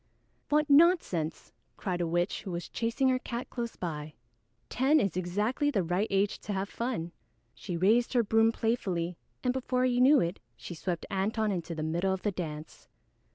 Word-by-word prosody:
"What 300 0 +3
nonsense!" 280 - +3 0.3
cried 180 -3 -2
a 170 - 0
witch 175 +3 0
who 200 - -7
was 175 -1 -4
chasing 235 +4 0
her 255 0 +2
cat 240 0 -5
close 235 -2 -4
by. 150 -3 -5 0.5
"Ten 280 +5 +3
is 195 - 0
exactly 210 +11 0
the 200 -10 +1
right 180 +5 0
age 195 +1 +1
to 205 - -5
have 195 +1 -2
fun." 230 -9 -3 0.4
She 175 +6 -5
raised 220 +9 +3
her 240 -2 +4
broom 225 +1 +4
playfully, 185 -7 -1 0.3
and 250 -1 +1
before 255 -1 0
he 250 -1 +2
knew 275 +3 +7
it, 170 +2 -1 0.2
she 115 - -8
swept 170 0 -3
Antone 210 +2 0
into 170 -3 -3
the 155 - -3
middle 170 +4 0
of 185 - -11
the 210 - +1
dance. 155 -4 -7
200 Hz, 180 wpm, -30 LUFS, 175-245 Hz, 0.5 s, knew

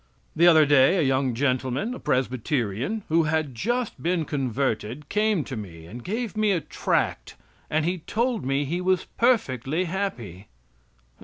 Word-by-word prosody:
The 170 +2 +5
other 160 -3 +7
day 145 +5 +5
a 170 - +2
young 130 -2 +1
gentleman, 130 - 0
a - - -7
Presbyterian, 130 - -1
who 165 0 +3
had 155 -3 0
just 240 - -2
been 170 -1 0
converted, 130 -1 -2
came 210 -5 +1
to 135 - -6
me 85 -7 -8
and 115 +8 -9
gave 220 +2 -3
me 215 0 +2
a 175 - +1
tract - - -2 0.3
and 155 0 +1
he 180 +1 -1
told 230 +6 -1
me 135 +2 0
he 170 +6 -2
was 185 0 +1
perfectly 165 - +1
happy. 125 - -4
150 Hz, 155 wpm, -25 LUFS, 130-185 Hz, 0.3 s, other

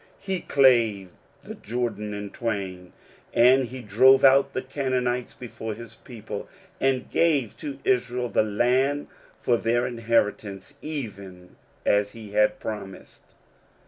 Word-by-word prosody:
He 190 -3 -3
clave 115 - +3 0.3
the - - -8
Jordan 110 -2 -3
in 100 -1 -6
twain, 95 -6 -4 0.4
and 130 +2 +5
he 125 +1 -8
drove 130 +6 +5
out 135 0 +5
the 130 - -3
Canaanites 130 -2 -2
before 110 -3 -6
his 115 -1 -11
people, 110 -3 -8 0.3
and 130 -1 0
gave 145 -9 +2
to 140 -3 -6
Israel 125 -1 0
the - - +2
land 125 +7 +1 0.3
for 120 - +1
their 120 +2 +1
inheritance, 115 -2 -1
even 100 -12 -7 0.3
as 105 0 +2
he 110 -3 -10
had 105 +1 +2
promised. 100 -3 -8
120 Hz, 125 wpm, -25 LUFS, 105-130 Hz, 0.4 s, and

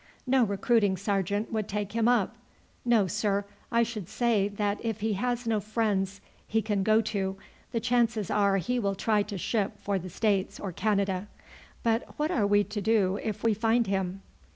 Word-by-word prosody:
No 260 -1 +4
recruiting 205 -1 +2
sergeant 200 +2 -1
would 215 -2 -1
take 205 0 -3
him 230 0 +1
up. 245 0 +2 0.5
No, 235 -4 +4
sir; 200 +2 0 0.3
I 235 0 +4
should 220 -6 -5
say 230 -5 +2
that 205 0 -2
if 225 -2 -2
he 220 0 +1
has 245 +4 -1
no 225 -2 +1
friends 200 -2 -1 0.3
he 225 - +1
can 205 -2 0
go 215 +3 +4
to, 195 -3 -2 0.3
the 235 - 0
chances 235 -4 +1
are 200 -1 +3
he 245 +7 0
will 200 -3 0
try 210 +2 +2
to 205 -1 -4
ship 205 +2 -1
for 200 -1 -1
the 185 +1 -7
States 200 +1 0
or 195 - -4
Canada. 195 0 0 0.6
But 230 0 0
what 305 +3 0
are 215 - +2
we 205 0 +4
to 210 +1 -5
do 200 -2 +2
if 215 -3 -4
we 225 -1 +4
find 225 +3 +2
him?" 195 -1 -2
210 Hz, 185 wpm, -28 LUFS, 195-225 Hz, 0.6 s, No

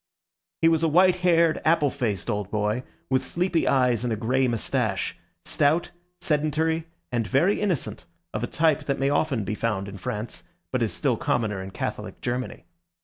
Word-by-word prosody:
He - - +7
was 165 -1 +3
a 165 - +3
white 180 +3 +5
haired, 170 -3 +3
apple 155 -3 +3
faced 105 -7 -2
old 105 -4 -2
boy, 105 +3 0 0.3
with 130 - +3
sleepy 175 -1 0
eyes 125 -4 +3
and 120 - -1
a - - +1
grey 125 +4 +1
moustache; 115 -3 -1 0.3
stout, 155 +4 +1 0.3
sedentary, 160 0 0 0.2
and 115 -4 0
very 185 - +2
innocent, 130 - -2 0.3
of 110 - -2
a - - 0
type 155 0 +1
that 140 -1 0
may 135 +1 +1
often 145 -6 +1
be 100 - -3
found 105 -3 -1
in 100 0 -8
France, 110 +2 -5 0.3
but - - 0
is - - +1
still - - 0
commoner 105 -5 0
in 95 - -6
Catholic - - -5
Germany. 125 -4 -4
130 Hz, 175 wpm, -25 LUFS, 110-160 Hz, 0.3 s, He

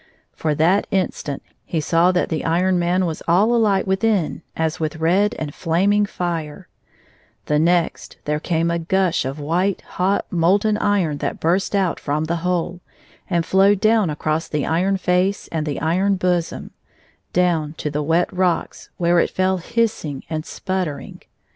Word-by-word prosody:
For 155 -2 -1
that 175 +7 +2
instant 175 -7 -2 0.2
he 165 - -2
saw 165 +4 +3
that 180 - 0
the 160 - -2
Iron 180 +3 +2
Man 180 +2 +1
was 160 -2 -4
all 195 +8 +4
alight 210 -5 +2
within 190 -3 0 0.2
as 160 +2 -1
with 155 -1 -2
red 190 +8 +2
and 150 -2 -5
flaming 200 +5 +1
fire; 165 -5 -4 0.8
the 150 0 +1
next 170 +1 0
there 150 0 0
came 165 +1 0
a 170 - 0
gush 180 -2 +1
of 135 +3 -4
white, 175 +6 0
hot 190 +2 -1
molten 195 +5 +2
iron 185 -9 +1
that - - -3
burst 185 +5 +1
out 190 -4 +1
from 150 +1 -1
the 170 +2 -1
hole, 175 0 -2 0.5
and 170 -3 +1
flowed 195 +2 +4
down 215 -3 +3
across 155 +2 -2
the 150 -2 -2
iron 185 +4 +1
face 185 +2 0
and 160 -2 -3
the 145 - -2
iron 185 +5 +1
bosom 180 -2 -1 0.3
— - - -33 0.2
down 170 -4 +1
to 150 -2 -4
the 150 +1 -1
wet 165 +5 +1
rocks, 180 -2 -1
where 170 0 +3
it - - +2
fell 185 0 +1
hissing 180 - -2
and 155 0 -3
sputtering. 185 -6 -4
175 Hz, 165 wpm, -21 LUFS, 160-190 Hz, 0.8 s, all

